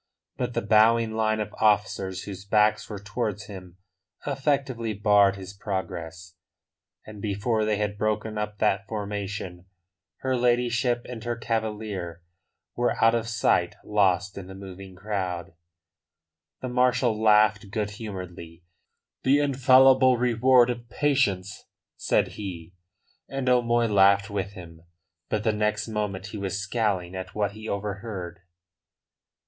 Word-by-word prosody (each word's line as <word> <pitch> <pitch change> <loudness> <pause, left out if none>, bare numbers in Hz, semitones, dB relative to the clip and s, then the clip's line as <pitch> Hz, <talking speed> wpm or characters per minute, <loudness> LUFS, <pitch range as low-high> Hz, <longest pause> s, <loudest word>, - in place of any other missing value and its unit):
But 125 -1 -3
the - - 0
bowing 110 +2 +4
line 110 0 0
of 105 -1 -4
officers 105 -3 +1
whose 95 -2 -8
backs 105 +1 +2
were 105 - -5
towards 105 0 -4
him 95 -3 -11 0.5
effectively 135 -5 -1
barred 100 -1 +4
his 95 0 -9
progress, 85 -4 -5 0.7
and 105 -1 -10
before 105 +2 0
they 105 -1 +1
had 105 0 -2
broken 110 0 -1
up 105 0 -3
that 100 -2 +1
formation 100 -3 -5 0.5
her 130 -1 0
ladyship 120 0 +1
and 120 -3 -7
her 120 0 -2
cavalier 105 -7 -3 0.5
were 120 0 +1
out 115 0 +5
of 115 -1 -1
sight, 110 -6 +1
lost 100 -1 +1
in 95 - -9
the 95 - -10
moving 95 -1 -10
crowd. 95 -3 -4 1.1
The 130 - -4
marshal 125 -3 +2
laughed 105 -1 +4
good 105 0 -2
humouredly. 90 -6 -8 0.6
"The 135 +2 +4
infallible 130 -2 +5
reward 125 +1 +4
of 120 -1 -8
patience," 115 -10 0 0.3
said - - +1
he. 90 -4 -8 0.6
And 135 -1 -3
O'Moy 120 -1 +3
laughed 100 -1 +4
with 100 -1 -3
him. 85 -4 -11 0.5
But 105 -1 -1
the 110 - +2
next 105 0 -1
moment 105 -3 -3
he 105 - -6
was 100 0 -3
scowling 100 -4 -1
at 95 0 -7
what 105 -2 0
he 110 +1 -8
overheard. 100 -3 -5
105 Hz, 130 wpm, -26 LUFS, 95-115 Hz, 1.1 s, out